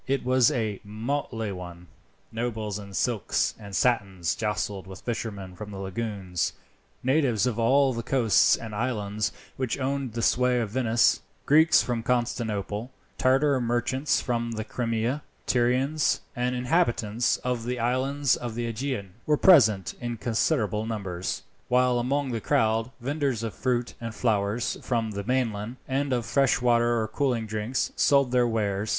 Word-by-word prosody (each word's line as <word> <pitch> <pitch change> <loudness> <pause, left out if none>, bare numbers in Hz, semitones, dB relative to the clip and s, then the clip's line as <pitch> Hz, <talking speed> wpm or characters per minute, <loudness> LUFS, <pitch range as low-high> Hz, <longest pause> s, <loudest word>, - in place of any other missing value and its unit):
It 135 -1 0
was 130 -1 +4
a 110 -4 -2
motley 115 0 -3
one. 90 -2 -8 0.5
Nobles 110 -3 -3
in 100 -1 -9
silks 115 -7 0
and 100 -2 -8
satins 95 -9 +1
jostled 105 -3 -2
with 95 - -10
fishermen 100 -6 -5
of 105 - -6
the 100 - -8
lagoons. 95 -2 -3 0.5
Natives 130 -6 +2
of 120 -2 -1
all 135 +3 +4
the 115 - -3
coasts 115 -3 +4
and 110 -2 -8
islands 105 -3 -1 0.3
which 130 -3 -1
owned 135 -2 -2
the 115 0 -2
sway 125 +1 +3
of 110 -4 -2
Venice, 120 -1 +3 0.2
Greeks 155 +2 +5
from 120 -2 -2
Constantinople, 115 -2 -1 0.3
Tartar 135 +1 +3
merchants 120 +4 +1
from 120 -2 -2
the 110 -1 -3
Crimea, 115 +4 -1 0.2
Tyrians, 130 +5 +2
and 125 0 0
inhabitants 120 -4 +1
of 125 -2 -2
the 125 +1 -2
islands 130 +3 +1
of 120 -2 -5
the 120 0 -2
Aegean, 115 -4 -3 0.2
were 150 -1 +3
present 110 - +5
in 120 -1 -3
considerable 110 -2 0
numbers; 95 -5 -3 0.2
while 125 0 +3
among 135 +2 0
the 115 -2 -2
crowd, 110 +2 +1
vendors 135 -3 -1
of 115 - -3
fruit 125 -2 -1
and 115 -1 -5
flowers 110 0 0
from 115 -3 -1
the 100 -1 -4
mainland, 115 -2 -1
and 135 +1 -1
of 120 -2 0
fresh 135 +2 +2
water 120 -1 +3
or 110 - -1
cooling 120 -1 0
drinks, 110 +4 -2
sold 140 -3 +3
their 125 -1 +3
wares. 105 -2 -1
120 Hz, 150 wpm, -26 LUFS, 105-130 Hz, 0.5 s, Greeks